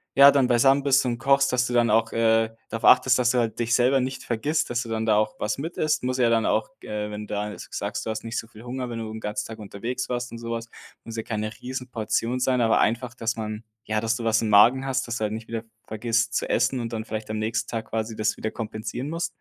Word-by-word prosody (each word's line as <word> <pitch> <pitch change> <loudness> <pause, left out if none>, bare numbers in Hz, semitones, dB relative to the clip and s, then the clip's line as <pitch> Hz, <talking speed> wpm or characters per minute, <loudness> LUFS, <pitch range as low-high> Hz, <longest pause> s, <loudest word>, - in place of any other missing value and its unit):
ja, 140 +1 +9
dann 135 -3 +3
beisammen 135 +3 +4
bist 135 -1 +4
und 120 -1 -1
kochst, 140 +1 +3
dass 125 0 +2
du 120 - -4
dann 120 -1 +3
auch, 115 +1 +2
äh, 115 -1 +3 0.2
darauf 115 - -3
achtest, 130 -1 +6
dass 125 0 +3
du 125 - +2
halt 115 -1 -1
dich 120 0 +2
selber 130 +2 +4
nicht 130 +1 -3
vergisst, 145 +7 -1
dass 120 0 -1
du - - -10
dann 110 0 -1
da 110 - +4
auch 110 0 +1
was 105 +2 -1
mit 165 +5 -5
isst. 155 -3 0
Muss 130 +1 -1
ja 120 -2 +4
dann 115 -1 +2
auch 110 - +1
g - - -13
äh, 105 0 -3
wenn 105 0 -6
du - - -6
da 105 +1 -2
s - - -9
g - - -9
sagst, - - -3
du - - -3
hast 110 +1 -5
nicht 115 +2 -4
so 115 - -7
viel 110 -1 -14
Hunger, 125 0 -4
wenn 115 -1 -5
du 110 -1 -5
'n 110 - -6
ganzen 105 0 -3
Tag 110 -1 -9
unterwegs 115 +5 -4
warst 125 0 -3
und 115 - -7
so 115 0 -6
was, 115 0 -4 0.3
muss 115 0 -8
ja 110 - -2
keine 110 -1 -3
Riesenportion 125 -2 -2
sein. 125 -1 +2
Aber 115 -1 +3
einfach, 120 +3 0
dass 120 0 -2
man 110 0 -5 0.2
ja, 110 0 0
dass 115 +1 0
du 115 - -5
was 110 -1 +2
im 110 - -1
Magen 120 +6 +6
hast, 130 -2 -1
dass 120 - -2
du 110 - -3
halt 105 0 -1
nicht 110 +1 -7
wieder 115 -1 -3
v 115 - -30 0.2
vergisst 115 +1 0
zu - - 0
essen 130 - +2
und 115 -1 -4
dann 110 - -3
vielleicht 110 0 -5
am 110 - -2
nächsten 110 +1 -1
Tag 115 -1 -4
quasi 110 0 -2
das 110 -1 0
wieder 110 - -2
kompensieren 115 +4 -5
musst? 170 +1 -2
115 Hz, 285 wpm, -25 LUFS, 110-125 Hz, 0.3 s, ja